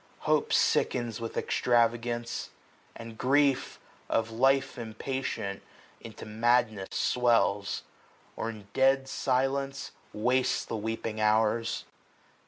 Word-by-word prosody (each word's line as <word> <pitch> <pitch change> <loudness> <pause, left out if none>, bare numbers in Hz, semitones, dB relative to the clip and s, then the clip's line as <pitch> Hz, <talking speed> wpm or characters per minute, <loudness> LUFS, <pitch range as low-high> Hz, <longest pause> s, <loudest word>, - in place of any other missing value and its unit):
Hope - - +1
sickens 120 -3 +1
with 115 - -5
extravagance; 120 0 0 0.5
and 115 -1 -10
grief. 140 0 +2 0.3
Of 115 0 0
life 135 +4 +2
impatient, 110 -3 -4 0.4
into - - -10
madness 110 -2 +1
swells; 115 -5 +1 0.5
Or 115 - -3
in 105 -3 -9
dead 135 0 +3
silence 135 +1 -1 0.2
wastes 125 +4 +1
the - - -4
weeping 110 0 -3
hours. 110 +1 +1
120 Hz, 95 wpm, -29 LUFS, 110-130 Hz, 0.5 s, dead